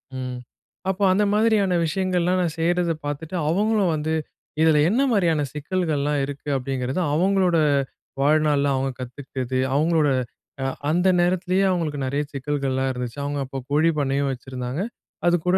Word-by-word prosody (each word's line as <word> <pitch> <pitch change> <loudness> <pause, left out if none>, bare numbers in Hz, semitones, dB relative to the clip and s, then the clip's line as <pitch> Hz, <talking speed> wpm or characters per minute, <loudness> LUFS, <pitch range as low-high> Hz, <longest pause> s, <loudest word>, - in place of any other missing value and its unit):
ம். 125 -1 -4 0.5
அப்போ 190 +1 -1
அந்த 205 +3 +2
மாரியான 210 -4 +3
விஷயங்கள்லாம் 180 +1 +1
நான் 165 -3 -1
செய்றத 175 +1 +1
பாத்துட்டு, 150 +4 -4
அவுங்களும் 205 +1 +2
வந்து, 155 +1 -2 0.5
இதுல 160 -2 +5
என்ன 235 +7 +2
மாரியான 170 -8 +2
சிக்கல்கள்லாம் 150 -2 -1
இருக்கு? 140 +1 -8
அப்படிங்கிறது, 130 +2 -2
அவுங்களோட 185 +1 +3 0.6
வாழ்நாள்ல 145 -1 +3
அவுங்க 135 0 -1
கத்துக்கிட்டது. 130 0 -4 0.2
அவுங்களோட 155 0 +3 0.6
அ - - +1 0.2
அந்த 175 +4 +2
நேரத்திலயே 185 +2 +2
அவுங்களுக்கு 165 -5 -1
நெறையா 140 +3 -1
சிக்கல்கள்லாம் 135 -1 -1
இருந்துச்சு. 125 0 -5
அவுங்க 145 0 -2
அப்போ 135 +1 -7
கோழி 155 +3 +3
பண்ணையும் 140 0 0
வச்சிருந்தாங்க, 130 +1 -5 0.5
அதுக்கூட 175 +1 +3
155 Hz, 130 wpm, -23 LUFS, 140-180 Hz, 0.6 s, இதுல